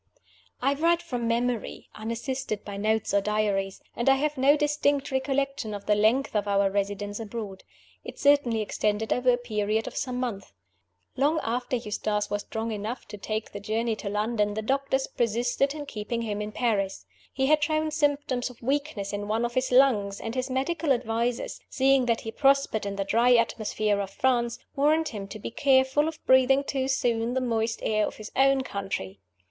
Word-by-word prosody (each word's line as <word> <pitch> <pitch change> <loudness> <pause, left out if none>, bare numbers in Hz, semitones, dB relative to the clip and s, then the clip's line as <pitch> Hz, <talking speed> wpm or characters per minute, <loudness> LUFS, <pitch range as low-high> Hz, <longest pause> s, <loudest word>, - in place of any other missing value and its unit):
I 275 +2 +3
write 335 +4 +2
from 245 -8 -3
memory, 235 0 -1
unassisted 230 +1 -4
by 200 - -6
notes 215 +1 0
or 200 - +4
diaries; 200 -2 -1
and 235 +3 +1
I 270 - +6
have 300 +2 -1
no 275 +2 +4
distinct 290 -1 +1
recollection 265 -4 -1
of 200 - -8
the 210 - +3
length 220 +5 +2
of 210 -1 +1
our 200 -1 +2
residence 205 +1 -2
abroad. 210 -3 -6 0.4
It - - -9
certainly 280 -6 +3
extended 215 +1 0
over 250 +1 +1
a 245 - +4
period 215 -2 -1
of - - -7
some 250 -1 -2
months. 225 -6 -4 0.6
Long 295 +4 +2
after 245 +2 -1
Eustace 210 -2 -2
was 205 0 -1
strong 225 +2 -4
enough 215 +4 -5
to 210 - -7
take 215 +2 -4
the 205 - -6
journey 220 +2 -1
to 200 - -5
London 210 0 0
the 220 - -3
doctors 270 +2 0
persisted 240 +5 0
in 295 -1 -5
keeping 230 -1 -4
him 210 -2 -3
in 210 0 -4
Paris. 205 -5 -1 0.3
He 265 - 0
had 300 +2 +3
shown 310 0 0
symptoms 290 -5 0
of 245 -1 -15
weakness 265 -7 -2
in 205 0 -3
one 225 +3 0
of 240 - -3
his 255 +1 0
lungs, 225 -7 +4
and 225 - -5
his 255 +1 -2
medical 275 +3 +1
advisers, 235 0 -2
seeing 265 -1 +3
that 230 -1 +1
he 225 - -5
prospered 275 -5 +2
in 200 - -3
the 195 - -1
dry 240 +4 +4
atmosphere 215 -2 +1
of 195 - -4
France, 240 +1 +1 0.2
warned 310 +3 +2
him 200 -4 -6
to 200 - -8
be 215 - -6
careful 265 +3 +3
of 320 -1 -4
breathing 260 +1 +5
too 265 -1 -2
soon 240 -2 0
the - - +2
moist 230 -2 -1
air 215 -1 +1
of - - -7
his 215 -1 -9
own 270 0 +4
country. 195 - -5
235 Hz, 185 wpm, -27 LUFS, 210-270 Hz, 0.6 s, I